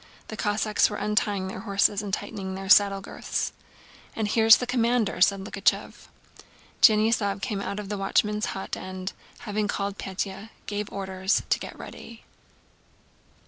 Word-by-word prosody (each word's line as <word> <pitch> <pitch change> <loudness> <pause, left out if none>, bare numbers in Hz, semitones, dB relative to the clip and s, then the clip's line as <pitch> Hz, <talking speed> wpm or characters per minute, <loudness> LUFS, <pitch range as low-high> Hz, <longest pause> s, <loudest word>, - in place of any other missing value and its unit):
The 220 - -5
Cossacks 210 0 +1
were 210 - -5
untying 205 -2 0
their 190 - -6
horses 200 -1 +2
and 205 -2 -5
tightening 190 -1 -4
their 195 0 -6
saddle 200 -1 +6
girths. - - -3 0.6
"And 220 -2 -1
here's 225 +1 +7
the 250 - -3
commander," 240 -5 +1
said 195 +1 +4
Likhachëv. 195 - -1 0.7
Denísov 215 -2 +4
came 210 -6 -2
out 200 +1 -4
of 205 -2 -7
the 205 -1 -3
watchman's 210 +3 +1
hut 190 - -4
and, 185 0 -6 0.3
having 210 -2 -2
called 200 -1 -3
Pétya, 195 +2 -5 0.2
gave 205 0 -4
orders 190 0 -1
to - - +3
get - - -8
ready. 230 -1 -11
205 Hz, 145 wpm, -26 LUFS, 195-215 Hz, 0.7 s, here's